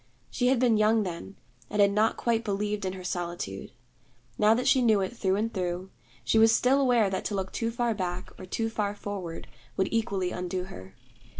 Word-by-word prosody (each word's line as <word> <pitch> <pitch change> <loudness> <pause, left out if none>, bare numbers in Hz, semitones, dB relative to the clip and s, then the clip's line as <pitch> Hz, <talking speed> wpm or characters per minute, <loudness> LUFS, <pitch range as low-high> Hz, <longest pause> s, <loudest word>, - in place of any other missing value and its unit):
She 245 - +1
had 260 +1 +4
been 240 -3 +3
young 215 +1 +4
then, 185 +1 -6 0.3
and 210 - -3
had 200 0 +6
not 215 +2 +2
quite 230 -1 0
believed 205 -1 -2
in 185 - -2
her 185 -1 -8
solitude. 175 - -4 0.6
Now 215 +1 +4
that 250 - -1
she 260 - +5
knew 220 -4 +4
it 190 +5 -3
through 190 -4 +1
and 225 +3 -1
through, 180 0 -3 0.3
she 220 - +3
was 225 0 +7
still 260 +4 +3
aware 245 -5 +4
that 190 - -2
to 205 - -2
look 190 -1 -3
too 230 - -1
far 235 0 0
back 180 -2 -4
or 185 - -9
too 225 +4 -1
far 205 -2 -1
forward 195 -5 -6 0.3
would 190 - +1
equally 200 -5 0
undo 180 0 -3
her. 95 - -11
205 Hz, 205 wpm, -28 LUFS, 185-225 Hz, 0.6 s, was